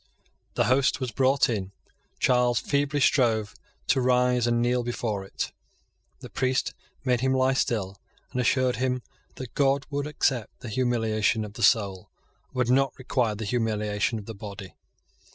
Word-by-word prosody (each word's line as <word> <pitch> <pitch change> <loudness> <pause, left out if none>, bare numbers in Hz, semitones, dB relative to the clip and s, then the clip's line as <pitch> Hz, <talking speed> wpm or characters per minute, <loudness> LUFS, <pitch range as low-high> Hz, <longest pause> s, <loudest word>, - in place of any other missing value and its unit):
The - - +3
host 130 +2 +2
was 130 -3 -3
brought 135 +2 +3
in. 100 -5 -3 0.4
Charles 125 -1 +3
feebly 145 0 0
strove 115 -6 +2 0.3
to 130 - +2
rise 125 -1 +3
and 120 0 +2
kneel 120 +1 +2
before 115 -4 -3
it. 95 - -4 0.7
The - - -9
priest 130 0 0 0.3
made 125 -2 +2
him 130 0 +2
lie 130 0 +3
still, 100 -7 -1 0.3
and 125 - -1
assured 125 0 +2
him 125 0 -1 0.3
that 130 -3 -8
God 140 -1 +2
would 145 +1 -2
accept 130 -6 -1
the 120 - -6
humiliation 110 -2 +1
of 105 - -10
the - - -8
soul, 100 -5 +2 0.4
and - - -28
would 125 -1 +1
not 135 +1 +2
require 125 -4 0
the 110 +1 -5
humiliation 105 -1 0
of 105 - -8
the 115 - -7
body. 100 -2 -9
120 Hz, 160 wpm, -26 LUFS, 110-130 Hz, 0.7 s, The